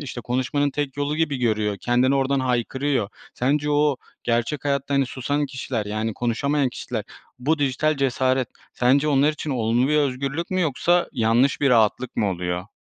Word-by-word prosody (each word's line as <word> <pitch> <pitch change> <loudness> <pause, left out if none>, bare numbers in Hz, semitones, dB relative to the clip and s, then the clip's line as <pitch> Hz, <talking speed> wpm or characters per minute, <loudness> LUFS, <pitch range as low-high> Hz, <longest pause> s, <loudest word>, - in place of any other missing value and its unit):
işte, 130 -4 -6
konuşmanın 130 +4 0
tek 145 -1 -3
yolu 145 +1 -1
gibi 155 -4 0
görüyor. 105 -4 0
Kendini 125 +3 +2
oradan 135 0 +1
haykırıyor. 130 -1 0 0.3
Sence 145 +4 0
o 145 -2 +2 0.3
gerçek 120 +5 -1
hayatta, 140 0 0
hani, 135 -1 +2
susan 145 +3 -2
kişiler, 130 -4 -4
yani, 110 +1 -2
konuşamayan 135 +4 0
kişiler, 115 -3 -5 0.3
bu 150 +5 +1
dijital 145 +2 +1
cesaret 130 -1 +1 0.2
sence 140 +4 +2
onlar 145 +2 +3
için 150 0 -5
olumlu 120 +1 +1
bir 150 - +2
özgürlük 140 +3 -1
mü, 185 0 0
yoksa 170 +3 +2
yanlış 120 +3 +2
bir 140 -2 +3
rahatlık 115 +2 +2
mı 100 -2 +1
oluyor? 90 +2 -4
130 Hz, 165 wpm, -23 LUFS, 120-145 Hz, 0.3 s, onlar